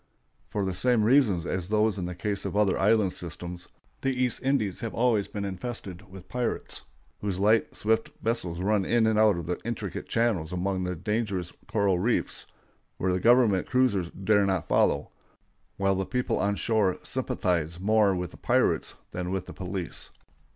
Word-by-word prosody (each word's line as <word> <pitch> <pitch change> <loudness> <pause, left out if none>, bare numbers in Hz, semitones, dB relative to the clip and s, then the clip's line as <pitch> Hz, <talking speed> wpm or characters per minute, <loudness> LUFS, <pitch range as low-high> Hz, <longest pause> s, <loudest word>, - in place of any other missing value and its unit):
For 100 -2 -1
the 95 - -1
same 120 +4 +2
reasons 110 - +4
as 90 -2 -2
those 105 0 +2
in 90 - -2
the 90 - -5
case 100 +2 -2
of - - -3
other 105 -3 +3
island 105 -2 +3
systems, 85 +1 -6 0.3
the 135 - +1
East 125 -1 0
Indies 130 -9 0
have 115 - -4
always 115 -4 +2
been 100 -1 -4
infested 100 -1 -6
with 95 -1 -12
pirates, 125 -1 -3 0.4
whose 100 -3 -2
light, 105 +3 +2
swift 110 +1 +1
vessels 90 -7 -2
run 100 +1 +2
in 115 +3 +2
and 110 -1 +3
out 105 -4 +5
of 85 - -4
the 90 +2 -2
intricate 115 -1 -4
channels 110 -9 +1
among 95 +1 -1
the 90 0 -2
dangerous 100 -1 -2
coral 100 -4 +1
reefs, 115 +6 -1 0.5
where 90 0 +1
government 115 -3 +4
cruisers 125 -9 +2
dare 100 +1 +2
not 95 -4 0
follow, - - +2 0.7
while 95 0 +2
the 95 0 -2
people 125 -1 -1
on 100 0 +1
shore 105 -4 +1
sympathize 85 -2 -1
more 105 0 +3
with 90 -2 -3
the - - -13
pirates - - +1 0.2
than 90 0 -4
with 95 -1 -2
the - - -9
police. 90 -3 -4
100 Hz, 170 wpm, -27 LUFS, 90-110 Hz, 0.7 s, out